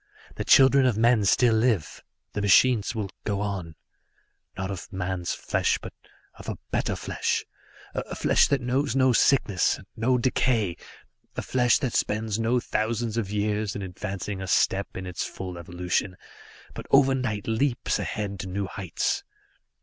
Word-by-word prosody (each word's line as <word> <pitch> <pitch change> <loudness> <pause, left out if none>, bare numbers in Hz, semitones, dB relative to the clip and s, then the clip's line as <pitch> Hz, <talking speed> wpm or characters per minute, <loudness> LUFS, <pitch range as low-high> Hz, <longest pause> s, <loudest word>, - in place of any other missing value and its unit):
The - - -4
children 135 0 +6
of 120 -5 +1
men 115 -2 +4
still 115 +4 +4
live 110 -8 0 0.3
the 105 - -2
machines 110 +3 +4
will 100 -4 -3
go 100 -2 -1
on. 95 -6 -4 0.8
Not 95 +1 -3
of 95 0 -7
man's 90 -2 -3
flesh, - - 0
but - - -9 0.4
of - - -9
a - - -4
better - - 0
flesh, - - -2 0.5
a - - -4
flesh - - +3
that 140 -2 +1
knows 125 +1 0
no 130 -1 +4
sickness, 110 -8 +3
and - - -14
no 125 +3 +2
decay, 120 -6 +1 0.6
a - - -3
flesh 125 -2 +3
that 130 -5 -2
spends 110 0 0
no 115 +2 +2
thousands 115 0 -2
of 115 -4 -2
years 105 0 -1
in 100 - -4
advancing 95 +1 -5
a 95 - -5
step 95 +2 +2
in 95 - -5
its 90 -2 -4
full 90 -2 -6
evolution, 90 +2 -2 0.6
but - - -8
overnight 130 -6 +2
leaps 120 +3 0
ahead 100 -2 -4
to 95 - -5
new 100 +2 -2
heights. 95 -3 -2
105 Hz, 155 wpm, -26 LUFS, 95-120 Hz, 0.8 s, children